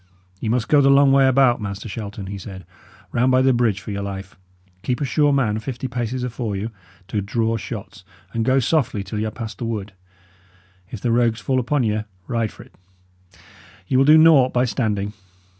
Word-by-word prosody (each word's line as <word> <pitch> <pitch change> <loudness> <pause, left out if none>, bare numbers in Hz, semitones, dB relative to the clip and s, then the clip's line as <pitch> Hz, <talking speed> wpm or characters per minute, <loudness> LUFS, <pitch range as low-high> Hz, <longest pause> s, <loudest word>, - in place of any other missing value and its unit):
"Ye 110 - -3
must 120 0 0
go 145 -1 +5
the 135 - +4
long 140 0 +6
way 135 0 +5
about, 130 -2 +3
Master 100 +1 -5
Shelton," 100 -1 -6
he 100 +1 -6
said; 95 -1 -9 0.5
"round 125 +2 +2
by 130 0 +4
the 130 0 +4
bridge, 115 -5 +1
for 105 - -7
your 100 0 -3
life! 95 -1 -6 0.5
Keep 125 +4 -2
a 145 - -1
sure 145 +2 +2
man 115 -6 +1
fifty 125 +3 -5
paces 125 0 -3
afore 120 -4 -3
you, 105 +4 -4 0.4
to 105 - -2
draw 115 +3 -1
shots; 105 -3 -7 0.3
and 115 - 0
go 130 +3 +2
softly 130 -5 +1
till 100 +2 -5
y' 110 - -1
are - - -2
past 110 0 -7
the 120 - -3
wood. 105 -3 -4 1.0
If 110 - -8
the 120 - 0
rogues 115 -1 +2
fall 130 +2 0
upon 135 +2 0
you, 110 -1 -1 0.2
ride 115 -3 -1
for - - -13
't; - - -21 1.1
ye 130 - -2
will 130 - +5
do 155 +2 +7
naught 155 -5 +6
by 125 +1 +2
standing. 105 -5 -1
115 Hz, 205 wpm, -21 LUFS, 105-130 Hz, 1.1 s, do